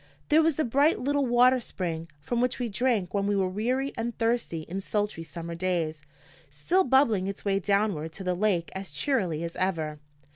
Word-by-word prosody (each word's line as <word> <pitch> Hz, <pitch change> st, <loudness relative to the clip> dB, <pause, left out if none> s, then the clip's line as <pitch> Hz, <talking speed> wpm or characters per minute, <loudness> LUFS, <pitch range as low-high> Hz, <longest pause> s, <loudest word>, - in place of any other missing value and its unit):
There 310 Hz, +2 st, +6 dB
was 320 Hz, -2 st, +2 dB
the 315 Hz, -, +1 dB
bright 280 Hz, +6 st, +3 dB
little 285 Hz, +1 st, 0 dB
water 250 Hz, +2 st, +5 dB
spring, 165 Hz, -7 st, -4 dB
from 235 Hz, +11 st, -1 dB
which 250 Hz, 0 st, 0 dB
we 245 Hz, -2 st, -2 dB
drank 210 Hz, -4 st, 0 dB
when 200 Hz, -1 st, 0 dB
we 205 Hz, -, +1 dB
were 190 Hz, -1 st, +2 dB
weary 250 Hz, +8 st, -1 dB
and 235 Hz, 0 st, -3 dB
thirsty 230 Hz, -8 st, 0 dB
in 180 Hz, +5 st, -5 dB
sultry 205 Hz, -3 st, -2 dB
summer 170 Hz, 0 st, -7 dB
days, 165 Hz, -4 st, -2 dB, 0.5 s
still 150 Hz, -, +1 dB
bubbling 235 Hz, -, +3 dB
its 200 Hz, +1 st, -6 dB
way 195 Hz, -1 st, +2 dB
downward 200 Hz, -5 st, 0 dB
to 190 Hz, -, -7 dB
the 180 Hz, -1 st, 0 dB
lake 180 Hz, -3 st, 0 dB
as 190 Hz, 0 st, -6 dB
cheerily 170 Hz, -, -1 dB
as 170 Hz, 0 st, -5 dB
ever. 160 Hz, -5 st, -1 dB
200 Hz, 190 wpm, -27 LUFS, 170-245 Hz, 0.5 s, There